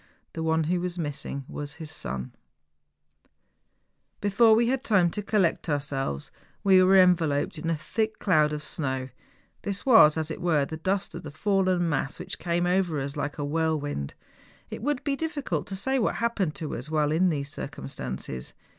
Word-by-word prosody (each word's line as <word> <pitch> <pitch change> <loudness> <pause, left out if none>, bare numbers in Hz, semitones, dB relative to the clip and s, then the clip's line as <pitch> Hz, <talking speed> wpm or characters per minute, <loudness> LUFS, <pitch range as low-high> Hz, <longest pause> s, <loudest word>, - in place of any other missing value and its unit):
The 165 - -4
one 160 0 +2
who 175 +3 0
was 180 0 -3
missing 145 -3 -4
was 145 0 -6
his 160 -1 -8
son! 65 +1 -5 1.9
Before 220 +2 +5
we 235 +2 +3
had 260 +1 0
time 185 -6 +3
to 210 - -3
collect 195 -5 +1
ourselves, 135 - -2 0.3
we 190 -2 +6
were 190 +1 +6
enveloped 165 -6 +3
in 165 - -3
a 165 - +2
thick 215 +8 -2
cloud 155 -6 +3
of 150 0 -4
snow: 130 -4 -3 0.5
this 200 -1 -3
was, 220 - +7
as 160 0 -1
it - - -6
were, 160 -5 +2
the 160 +3 -6
dust 190 +4 -1
of - - -6
the 150 - -8
fallen 185 +2 +1
mass, 140 -3 -1
which - - -6
came 175 0 0
over 180 -4 +1
us 140 +1 -4
like 145 - -3
a 145 - -2
whirlwind. 145 - -1 0.6
It - - -6
would 285 +2 -1
be 280 -2 0
difficult 285 - -3
to 195 - -4
say 265 +7 0
what 220 - +1
happened 210 -9 -1
to 155 - -4
us 125 +5 -6
while 150 -1 +1
in 180 +4 +3
these 140 -3 -2
circumstances. 65 - -6
165 Hz, 180 wpm, -27 LUFS, 145-195 Hz, 1.9 s, was